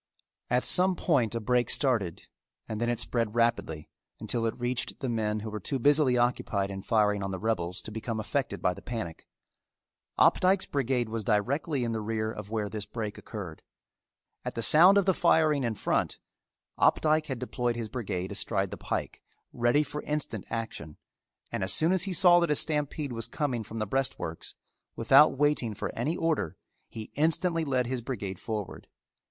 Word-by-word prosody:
At 125 +1 +2
some 185 +1 +4
point 125 - +1
a - - 0
break 120 +2 +1
started 115 - 0 0.4
and 110 0 -4
then 120 - +1
it 120 - -1
spread 115 -2 0
rapidly 115 -10 0 0.3
until 115 -1 -1
it 115 - -4
reached 120 0 -2
the 130 - -3
men 110 -2 -1
who 110 0 -6
were 105 - -4
too 135 +7 -2
busily 140 -1 +3
occupied 110 -5 0
in 95 0 -5
firing 105 -1 +2
on 95 - -3
the 95 - -3
rebels 90 -3 -2
to - - -7
become 110 +1 -4
affected 135 +6 -2
by 90 - +2
the - - -12
panic. 110 -9 -6 0.9
Opdycke's 190 +1 +4
brigade 130 -3 0
was 110 0 -3
directly 130 - 0
in 115 - -1
the 110 -1 -2
rear 110 0 -2
of 105 -2 -8
where 110 -2 -2
this 105 0 -5
break 110 -1 -5
occurred. 95 -8 -8 0.8
At - - -5
the 115 - -1
sound 180 - +7
of 200 - +3
the 190 - +4
firing 155 -5 +3
in 115 -2 -1
front, - - -1 0.6
Opdycke 155 0 +3
had 130 - -3
deployed 120 -1 -2
his 115 -2 -4
brigade 95 -6 -4
astride - - 0
the - - -6
pike, - - -4 0.3
ready 120 +5 +2
for 150 0 -6
instant 150 -9 -3
action, 110 -9 -5 0.5
and - - -2
as 95 - +2
soon 160 +3 +4
as 190 0 +3
he 190 - -3
saw 175 0 +6
that 170 -2 +1
a 150 - +3
stampede 150 -2 -1
was 115 -1 -2
coming 130 -7 -2
from 110 +1 -8
the 110 - -1
breastworks, 105 -8 -3 0.4
without 135 +5 +5
waiting 145 -6 +1
for - - -4
any 145 +9 -1
order, 160 - -1 0.3
he 110 -1 -8
instantly 165 +2 +1
led 130 -4 0
his 125 0 -2
brigade 100 -7 -5
forward. 105 -6 -5
120 Hz, 180 wpm, -28 LUFS, 110-145 Hz, 0.9 s, sound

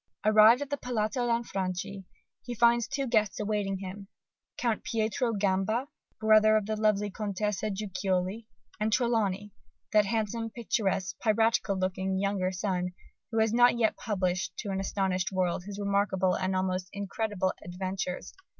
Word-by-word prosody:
Arrived 215 +5 +7
at 285 - -11
the 285 - 0
Palazzo 240 0 -1
Lanfranchi, 195 -4 -2 0.4
he 245 - -6
finds 235 0 +4
two 275 0 -2
guests 215 -5 +1
awaiting 205 -2 -1
him, 195 +1 -8 0.5
Count 230 -3 -1
Pietro 225 +2 0
Gamba, 205 +6 0 0.3
brother 215 0 +5
of 215 - -1
the 215 +1 -2
lovely 210 -1 +1
Contessa 210 0 -2
Guiccioli, 195 +1 -2 0.3
and 215 +1 0
Trelawny, 210 -4 +1 0.4
that 210 -2 +5
handsome, 225 +1 -1
picturesque, 195 -5 -1
piratical 220 -2 +2
looking 190 0 -1
"Younger 195 -1 0
Son," 180 -1 -2 0.4
who 225 - -3
has 220 0 +3
not 245 0 +5
yet 225 -2 +2
published 185 -5 -2
to 205 - -4
an 190 - -1
astonished 190 -1 -1
world 180 -1 -1
his 200 0 -7
remarkable 200 -2 +1
and 190 0 -1
almost 185 -1 -1
incredible 200 -1 -2
"Adventures." 185 0 -4
205 Hz, 140 wpm, -29 LUFS, 190-220 Hz, 0.5 s, Arrived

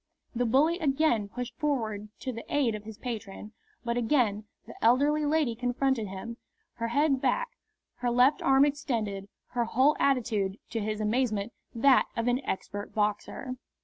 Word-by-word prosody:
The 245 0 0
bully 305 +9 +3
again 275 - +1
pushed 245 +1 -6
forward 220 -8 -1
to 255 - -3
the 230 - -7
aid 270 -6 +2
of 210 0 -7
his 220 -1 -9
patron, 215 -4 -6 0.3
but 235 0 -1
again 225 -4 +1 0.2
the - - -10
elderly 290 +6 +4
lady 300 -5 +2
confronted 245 -1 0
him, 195 +5 -7 0.4
her 230 - -2
head 275 +2 +2
back, - - +1 0.5
her 245 - -1
left 250 +4 +4
arm 270 +1 +5
extended, 225 -9 -2 0.2
her 240 -1 0
whole 260 +6 +3
attitude, 220 -8 +1
to 225 - -1
his 215 0 -2
amazement, 215 -1 0 0.2
that 260 +3 +5
of 230 +1 0
an 250 +3 +1
expert 205 +2 -4
boxer. 215 +5 -2
240 Hz, 155 wpm, -29 LUFS, 215-275 Hz, 0.5 s, arm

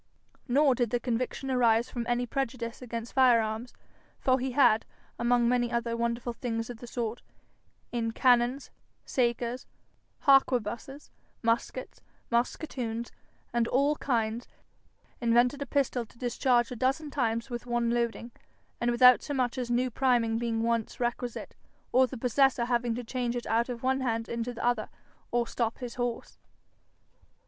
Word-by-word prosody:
Nor 275 +2 +4
did 240 -2 0
the 245 - 0
conviction 255 +2 -2
arise 235 -2 +3
from 235 -2 -4
any 240 0 +1
prejudice 240 -2 -3
against 235 -1 -6
fire 255 -3 +6
arms, 220 +2 -3 0.5
for 260 0 +2
he 255 0 -2
had, 235 -5 +5 0.4
among 240 0 +3
many 240 0 +1
other 235 0 -1
wonderful 235 +1 -2
things 230 -1 -3
of 240 - -9
the 240 - -10
sort, 235 -1 -3 0.7
in 230 -2 -1
cannons, 245 +3 +2 0.3
sakers, 240 0 -1 0.5
harquebusses, 270 -1 +2 0.3
muskets, 230 +2 -1 0.3
musquetoons, 235 -1 -2 0.4
and 235 -1 +2
all 280 +5 +2
kinds, 230 -2 -1 0.7
invented 240 +4 +3
a 280 - -3
pistol 260 -2 0
to 235 - -22
discharge 245 0 +1
a - - -4
dozen 270 +5 -1
times 230 -2 -1
with 240 0 -5
one 240 -1 +1
loading, 235 0 -1 0.5
and 240 - +1
without 250 +1 +7
so 290 - -4
much 250 -2 0
as 250 -2 -3
new 245 +1 +1
priming 235 -3 +2
being 230 -1 -1
once 230 -1 -1
requisite, 240 0 -3 0.4
or 255 +1 +5
the 260 - -7
possessor 250 +1 +2
having 240 -1 0
to 245 - -4
change 245 0 -2
it 240 - -4
out 230 +2 +1
of 240 -1 -5
one 265 +1 +2
hand 230 -3 -1
into 235 +1 -3
the 240 - -5
other, 245 0 +1 0.4
or 240 0 +1
stop 230 -1 -2
his 245 -2 -6
horse. 245 -1 -4
240 Hz, 155 wpm, -29 LUFS, 235-255 Hz, 0.7 s, without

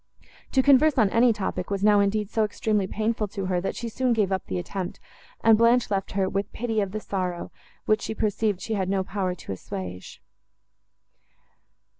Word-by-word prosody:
To 265 - +4
converse 285 +2 +5
on 215 -5 +4
any 235 +1 +5
topic, 200 -4 -3
was 200 -1 -2
now, 210 -1 +5
indeed, 205 +1 +1
so 220 - +2
extremely 210 -1 0
painful 220 +1 -1
to 195 -1 -5
her, 180 -1 0
that 195 - -3
she 235 - -4
soon 250 +2 0
gave 210 -4 +1
up 190 -1 -2
the 95 - -2
attempt, 180 - -5 0.4
and 225 -1 +7
Blanche 230 +1 +3
left 195 -1 -1
her, 195 -1 +1
with 195 +2 -2
pity 225 -2 -1
of 195 -2 -2
the 215 - -3
sorrow, 185 -4 -3 0.3
which 215 0 +2
she 220 - -4
perceived 210 -2 0
she 225 - -3
had 190 -3 -1
no 195 -1 +1
power 185 -2 -2
to 165 - -9
assuage. 90 -1 -7
205 Hz, 190 wpm, -25 LUFS, 190-225 Hz, 0.4 s, and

